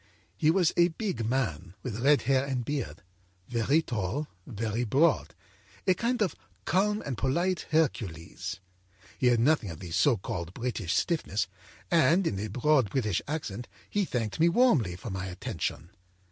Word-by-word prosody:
âHe 155 Hz, -, +5 dB
was 175 Hz, 0 st, +3 dB
a 170 Hz, 0 st, +6 dB
big 175 Hz, -, -3 dB
man, 95 Hz, -, -2 dB
with 115 Hz, -4 st, -4 dB
red 145 Hz, +2 st, +4 dB
hair 135 Hz, -1 st, +3 dB
and 130 Hz, -3 st, -2 dB
beard, 115 Hz, -, -3 dB, 0.4 s
very 125 Hz, +7 st, +2 dB
tall, 120 Hz, -, -2 dB, 0.2 s
very 115 Hz, 0 st, -2 dB
broad, 140 Hz, +6 st, +2 dB, 0.5 s
a 185 Hz, -, +5 dB
kind 235 Hz, +4 st, 0 dB
of 190 Hz, -, -1 dB, 0.3 s
calm 210 Hz, +4 st, +2 dB
and 130 Hz, -6 st, -3 dB
polite 175 Hz, +7 st, 0 dB
Hercules. 100 Hz, -, -1 dB, 0.6 s
He 125 Hz, -, +3 dB
had 120 Hz, -2 st, +4 dB
nothing 125 Hz, -4 st, +3 dB
of 80 Hz, -2 st, -7 dB
the 90 Hz, -3 st, -8 dB
so 125 Hz, -, +3 dB
called 85 Hz, -1 st, -5 dB
British 115 Hz, -8 st, -2 dB
stiffness, 110 Hz, -, 0 dB, 0.5 s
and 170 Hz, +3 st, +4 dB
in 100 Hz, -11 st, -1 dB
a 105 Hz, -, -2 dB
broad 125 Hz, +1 st, +2 dB
English 110 Hz, -9 st, +1 dB
accent 125 Hz, -7 st, -4 dB, 0.2 s
he 205 Hz, -, +2 dB
thanked 120 Hz, -, -2 dB
me 165 Hz, +2 st, +5 dB
warmly 170 Hz, -, +3 dB
for 100 Hz, +4 st, -7 dB
my 95 Hz, 0 st, -3 dB
attention. 90 Hz, -2 st, -4 dB
130 Hz, 160 wpm, -29 LUFS, 105-160 Hz, 0.6 s, a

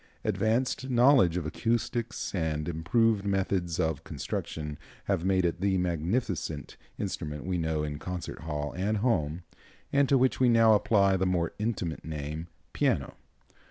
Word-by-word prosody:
Advanced 110 Hz, +5 st, 0 dB
knowledge 120 Hz, -, +5 dB
of 85 Hz, -, -2 dB
acoustics 115 Hz, +5 st, -2 dB
and 80 Hz, -4 st, -1 dB
improved 100 Hz, +6 st, +2 dB
methods 95 Hz, -4 st, 0 dB
of 80 Hz, -3 st, 0 dB
construction 75 Hz, -2 st, -5 dB, 0.2 s
have 95 Hz, -4 st, 0 dB
made 95 Hz, -1 st, +2 dB
it 85 Hz, +1 st, -1 dB
the 95 Hz, -1 st, +2 dB
magnificent 85 Hz, -, -2 dB, 0.2 s
instrument 75 Hz, -7 st, -4 dB
we 90 Hz, -1 st, -1 dB
know 80 Hz, -2 st, -1 dB
in 75 Hz, -1 st, -4 dB
concert 90 Hz, +1 st, -5 dB
hall 75 Hz, -2 st, -4 dB
and 100 Hz, +4 st, 0 dB
home, 90 Hz, -8 st, 0 dB, 0.5 s
and 140 Hz, -1 st, +4 dB
to 140 Hz, -, +5 dB
which 130 Hz, 0 st, +2 dB
we 130 Hz, -1 st, +5 dB
now 115 Hz, -1 st, +6 dB
apply 100 Hz, -2 st, +4 dB
the 95 Hz, 0 st, +1 dB
more 85 Hz, -2 st, 0 dB
intimate 105 Hz, -7 st, -2 dB
name, 75 Hz, +1 st, -5 dB, 0.3 s
piano. -, -, +1 dB
90 Hz, 145 wpm, -29 LUFS, 80-110 Hz, 0.5 s, now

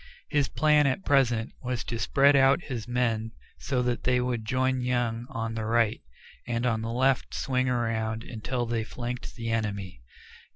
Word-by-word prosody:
His 145 Hz, -3 st, +2 dB
plan, 150 Hz, 0 st, +3 dB
at 140 Hz, +9 st, -1 dB
present, 125 Hz, -5 st, +2 dB
was 125 Hz, -2 st, -3 dB
to 115 Hz, -, -4 dB
spread 140 Hz, +3 st, +4 dB
out 135 Hz, +4 st, +4 dB
his 120 Hz, -5 st, -5 dB
men 115 Hz, -3 st, 0 dB, 0.3 s
so 130 Hz, -3 st, -1 dB
that 120 Hz, -1 st, -1 dB
they 125 Hz, -1 st, +3 dB
would 125 Hz, -3 st, -2 dB
join 130 Hz, +1 st, +1 dB
Young 120 Hz, -1 st, -1 dB
on 115 Hz, 0 st, -3 dB
the 110 Hz, -1 st, -3 dB
right, 115 Hz, 0 st, +2 dB, 0.5 s
and 120 Hz, 0 st, -1 dB
on 115 Hz, -3 st, +1 dB
the 115 Hz, +1 st, -3 dB
left 130 Hz, +2 st, +1 dB
swing 130 Hz, -1 st, 0 dB
around 115 Hz, -2 st, -1 dB
until 120 Hz, +1 st, -3 dB
they 115 Hz, -1 st, -1 dB
flanked 120 Hz, +2 st, -6 dB
the 115 Hz, -2 st, -3 dB
enemy. 100 Hz, -, -3 dB
120 Hz, 170 wpm, -27 LUFS, 115-130 Hz, 0.5 s, spread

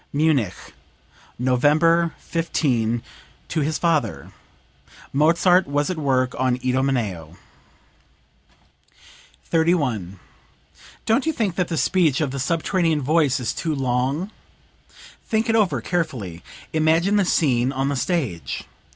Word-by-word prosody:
(Munich, 140 Hz, -, +1 dB, 0.8 s
November 155 Hz, +7 st, +2 dB
15, 120 Hz, -9 st, -1 dB, 0.5 s
to 160 Hz, -, -1 dB
his 155 Hz, +2 st, -1 dB
father. 155 Hz, -, -1 dB, 0.8 s
Mozart 170 Hz, +5 st, +4 dB
was 145 Hz, +4 st, 0 dB
at 180 Hz, -, -4 dB
work 130 Hz, -3 st, +1 dB
on 130 Hz, -1 st, +1 dB
"Idomeneo.") 120 Hz, -, -1 dB, 2.1 s
31. 145 Hz, -, 0 dB, 0.9 s
"Don't 255 Hz, +7 st, +1 dB
you -, -, +3 dB
think 220 Hz, -, -1 dB
that 180 Hz, 0 st, -1 dB
the 165 Hz, -, -3 dB
speech 165 Hz, -8 st, +2 dB
of 150 Hz, -4 st, -1 dB
the 135 Hz, -, -4 dB
subterranean 165 Hz, +1 st, 0 dB
voice 145 Hz, -2 st, +2 dB
is 120 Hz, -3 st, -2 dB
too 160 Hz, -2 st, -2 dB
long? 135 Hz, -, -1 dB, 1.0 s
Think 220 Hz, 0 st, 0 dB
it 225 Hz, -, +3 dB
over, 210 Hz, -5 st, +2 dB
carefully. 115 Hz, -, -3 dB, 0.3 s
Imagine 165 Hz, +6 st, +2 dB
the 205 Hz, -, +3 dB
scene 130 Hz, -8 st, +2 dB
on 135 Hz, 0 st, -1 dB
the 140 Hz, -, -1 dB
stage. 130 Hz, -, -2 dB
150 Hz, 115 wpm, -22 LUFS, 125-170 Hz, 2.1 s, Mozart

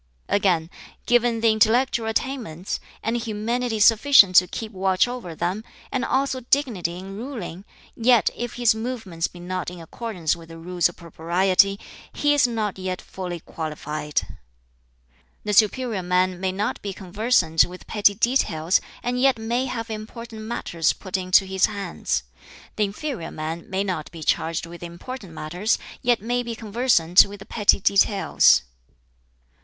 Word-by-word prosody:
"Again, 180 Hz, -4 st, +1 dB, 0.3 s
given 240 Hz, -1 st, +2 dB
the 225 Hz, -1 st, +5 dB
intellectual 225 Hz, +2 st, +2 dB
attainments, 225 Hz, -, -3 dB, 0.2 s
and 225 Hz, +2 st, -1 dB
humanity 230 Hz, +1 st, -2 dB
sufficient 215 Hz, -2 st, +6 dB
to 180 Hz, -, +7 dB
keep 220 Hz, +3 st, -6 dB
watch 190 Hz, +1 st, +2 dB
over 245 Hz, -9 st, -6 dB
them, 185 Hz, +7 st, -2 dB, 0.3 s
and 260 Hz, -, -1 dB
also 265 Hz, 0 st, 0 dB
dignity 235 Hz, -10 st, 0 dB
in 190 Hz, +1 st, -8 dB
ruling, 205 Hz, -6 st, -7 dB, 0.3 s
yet 240 Hz, -1 st, +4 dB
if 240 Hz, -1 st, -5 dB
his 240 Hz, -2 st, +3 dB
movements 220 Hz, -8 st, -3 dB
be 175 Hz, -, -14 dB
not 180 Hz, 0 st, -4 dB
in 180 Hz, 0 st, -10 dB
accordance 175 Hz, -1 st, -3 dB
with 165 Hz, -1 st, -14 dB
the 165 Hz, -, -10 dB
Rules 175 Hz, +1 st, 0 dB
of 175 Hz, -, -13 dB
Propriety, 185 Hz, +4 st, +1 dB, 0.3 s
he 290 Hz, 0 st, +2 dB
is 290 Hz, -3 st, +4 dB
not 215 Hz, -5 st, -3 dB
yet 185 Hz, -1 st, -3 dB
fully 180 Hz, -3 st, -6 dB
qualified. 150 Hz, -2 st, -4 dB, 1.2 s
"The 210 Hz, -, -2 dB
superior 220 Hz, 0 st, +2 dB
man 180 Hz, 0 st, +1 dB
may 190 Hz, 0 st, -1 dB
not 200 Hz, +3 st, -2 dB
be 200 Hz, -1 st, -4 dB
conversant 185 Hz, -4 st, +2 dB
with 180 Hz, +1 st, -11 dB
petty 205 Hz, -1 st, +3 dB
details, 190 Hz, -8 st, +1 dB, 0.2 s
and 250 Hz, +1 st, -1 dB
yet 270 Hz, -2 st, +4 dB
may 235 Hz, +4 st, -1 dB
have 230 Hz, -2 st, -4 dB
important 220 Hz, +1 st, -8 dB
matters 215 Hz, -7 st, -1 dB
put 185 Hz, -2 st, -7 dB
into 185 Hz, +1 st, +4 dB
his 190 Hz, -1 st, +2 dB
hands. 200 Hz, -, -3 dB, 0.5 s
The 210 Hz, -, +2 dB
inferior 210 Hz, -, -5 dB
man 160 Hz, +2 st, -6 dB
may 190 Hz, +1 st, 0 dB
not 180 Hz, -6 st, -3 dB
be 165 Hz, -2 st, -8 dB
charged 165 Hz, +2 st, 0 dB
with 170 Hz, 0 st, -11 dB
important 175 Hz, +3 st, -8 dB
matters, 180 Hz, +8 st, -1 dB, 0.2 s
yet 240 Hz, -4 st, +1 dB
may 245 Hz, +2 st, 0 dB
be 235 Hz, -1 st, -5 dB
conversant 215 Hz, -6 st, +4 dB
with 205 Hz, +1 st, -9 dB
the 195 Hz, -, -12 dB
petty 210 Hz, -3 st, +3 dB
details. 200 Hz, -, +4 dB
200 Hz, 150 wpm, -23 LUFS, 175-235 Hz, 1.2 s, to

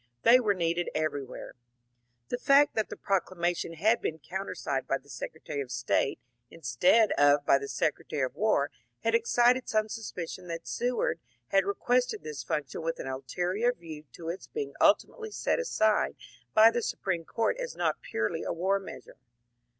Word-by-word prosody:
They 245 Hz, +2 st, +8 dB
were 210 Hz, -5 st, +1 dB
needed 170 Hz, 0 st, 0 dB
everywhere. 145 Hz, -4 st, -3 dB, 0.8 s
The 245 Hz, -, -2 dB
fact 280 Hz, +2 st, +5 dB
that 220 Hz, -, -1 dB
the -, -, -7 dB
proclamation 175 Hz, -3 st, -1 dB
had 215 Hz, +8 st, +2 dB
been 160 Hz, -, -2 dB
countersigned 165 Hz, -5 st, -4 dB
by 135 Hz, -, +1 dB
the 140 Hz, +1 st, -22 dB
Secretary 145 Hz, -1 st, -5 dB
of 135 Hz, -, -6 dB
State 125 Hz, +2 st, 0 dB, 0.3 s
instead 225 Hz, -, +3 dB
of 145 Hz, 0 st, +5 dB
by 135 Hz, -, +5 dB
the 140 Hz, -, -6 dB
Secretary 150 Hz, -1 st, -1 dB
of 130 Hz, -, -2 dB
War 190 Hz, -10 st, +1 dB, 0.3 s
had 230 Hz, -, +1 dB
excited 240 Hz, +2 st, +3 dB
some 215 Hz, 0 st, +1 dB
suspicion 185 Hz, -5 st, -6 dB
tiiat 165 Hz, -1 st, -6 dB
Seward 245 Hz, -8 st, -1 dB, 0.3 s
had 195 Hz, -1 st, +3 dB
requested 245 Hz, +5 st, 0 dB
this 150 Hz, -2 st, -6 dB
func 145 Hz, -4 st, -2 dB
tion -, -, -5 dB
with 165 Hz, 0 st, -3 dB
an -, -, -5 dB
ulterior 175 Hz, -, -1 dB
view 160 Hz, -7 st, -10 dB
to 165 Hz, -1 st, -7 dB
its 175 Hz, +3 st, -6 dB
being 435 Hz, -2 st, -4 dB
ultimately 445 Hz, -2 st, +3 dB
set 425 Hz, -, 0 dB
aside 220 Hz, -, +1 dB, 0.4 s
by 220 Hz, +1 st, +8 dB
the 240 Hz, -, -1 dB
Supreme 175 Hz, -6 st, -2 dB
Court 230 Hz, -, 0 dB
as -, -, -4 dB
not -, -, 0 dB
purely -, -, -2 dB
a -, -, -3 dB
war 190 Hz, +4 st, +1 dB
measure. 195 Hz, -, -11 dB
185 Hz, 165 wpm, -29 LUFS, 155-230 Hz, 0.8 s, They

